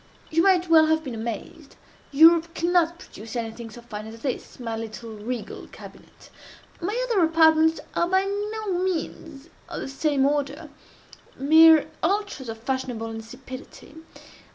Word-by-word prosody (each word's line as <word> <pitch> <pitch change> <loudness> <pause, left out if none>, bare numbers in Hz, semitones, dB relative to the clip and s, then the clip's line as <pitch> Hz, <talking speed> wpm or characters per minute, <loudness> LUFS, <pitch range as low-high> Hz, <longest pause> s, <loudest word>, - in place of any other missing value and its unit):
You 325 +1 +3
might 365 -1 +3
well 320 -1 +6
have 315 0 +1
been 265 -5 -6
amazed. 235 +6 -7 0.4
Europe 330 +3 +5
cannot 340 0 +1
produce 225 - -11
anything 230 0 -5
so 235 +2 -12
fine 215 -2 -8
as 225 +1 -11
this, 260 -2 -5
my 230 -2 -4
little 225 +1 -7
regal 220 +2 -6
cabinet. - - -15 0.5
My 410 +8 -2
other 425 -7 +2
apartments 320 0 +4
are 340 - 0
by 380 +1 +3
no 410 -1 -3
means 325 -4 -4 0.2
of - - -5
the - - -5
same 270 0 0
order—mere 295 +1 +2 0.2
ultras 390 - -1
of 225 - -5
fashionable 240 -2 -4
insipidity. 230 +5 -10
300 Hz, 135 wpm, -24 LUFS, 235-335 Hz, 0.5 s, well